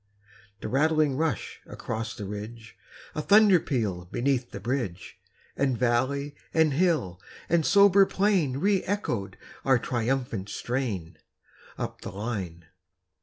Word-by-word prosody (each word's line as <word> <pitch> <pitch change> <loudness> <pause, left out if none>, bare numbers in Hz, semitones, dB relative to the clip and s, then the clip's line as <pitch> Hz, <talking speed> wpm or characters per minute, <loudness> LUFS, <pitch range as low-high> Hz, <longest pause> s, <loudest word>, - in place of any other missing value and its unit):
A - - -2
rattling 155 0 +2
rush 155 -6 -2
across 115 0 -5
the 105 - -6
ridge, 110 +3 -8 0.4
A 150 - -2
thunder 205 +1 +6
peal 105 - -2
beneath 125 +5 -1
the - - -7
bridge; 120 -8 -4 0.4
And 135 -3 +1
valley 130 +4 0 0.2
and 160 -3 +4
hill 150 - +1 0.3
and 170 -1 +2
sober 200 +2 +6
plain 185 -10 +1
Re 195 +4 +2
echoed 120 - -2 0.3
our 130 -2 +4
triumphant 120 -4 -2
strain, 100 - -3 0.6
Up - - -5
the - - -6
line. 95 -5 -5
130 Hz, 120 wpm, -27 LUFS, 105-155 Hz, 0.6 s, thunder